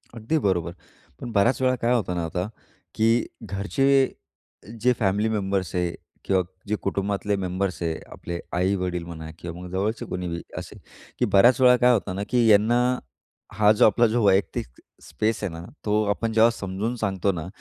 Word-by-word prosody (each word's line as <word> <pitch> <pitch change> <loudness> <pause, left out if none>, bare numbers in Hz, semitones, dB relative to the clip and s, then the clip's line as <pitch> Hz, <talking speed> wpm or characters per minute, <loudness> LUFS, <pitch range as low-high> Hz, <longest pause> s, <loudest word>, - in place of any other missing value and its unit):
अगदी 115 +8 -1
बरोबर. 85 -3 +1 0.5
पण 120 - -5
बऱ्याच 115 +6 +2
वेळा 130 0 +3
काय 120 +1 +2
होतं 100 -7 0
ना 85 -1 -1
आता, 90 +4 -3 0.5
की 115 +2 +3 0.2
घरचे 135 +7 +1 0.7
जे 125 +1 +4
फॅमिली 105 +2 +1
मेंबर्स 95 -4 -1
आहेत 90 -1 -1 0.3
किंवा 95 -1 +2 0.3
जे 105 - 0
कुटुंबातले 100 +1 -1
मेंबर्स 90 -2 -2
आहे. 80 -1 -2
आपले 85 0 -6 0.2
आई-वडील 90 -2 0
म्हणा 80 -2 -8
किंवा 85 0 -7
मग 90 - -8
जवळचे 105 +5 -2
कोणी 90 0 -4
बी 85 0 -4 0.2
असेल, - - -8 0.4
की - - +3
बऱ्याच 120 +7 +5
वेळा 125 0 +7
काय 125 0 +5
होतं 100 -4 -1
ना, 100 - -2
की 120 -2 +3
यांना, 110 +4 +4 0.7
हा 105 -1 +4
जो 105 - +5
आपला 115 +3 +4
जो 115 0 0
वैयक्तिक 95 -8 +2 0.4
स्पेस 110 0 -2
आहे 95 - -2
ना 85 +1 -8 0.2
तो 105 +1 +2
आपण 110 +2 -1
जेव्हा 115 +1 +6
समजून 105 +3 -3
सांगतो 100 -3 0
ना, 85 -2 -5
100 Hz, 175 wpm, -24 LUFS, 90-115 Hz, 0.7 s, वेळा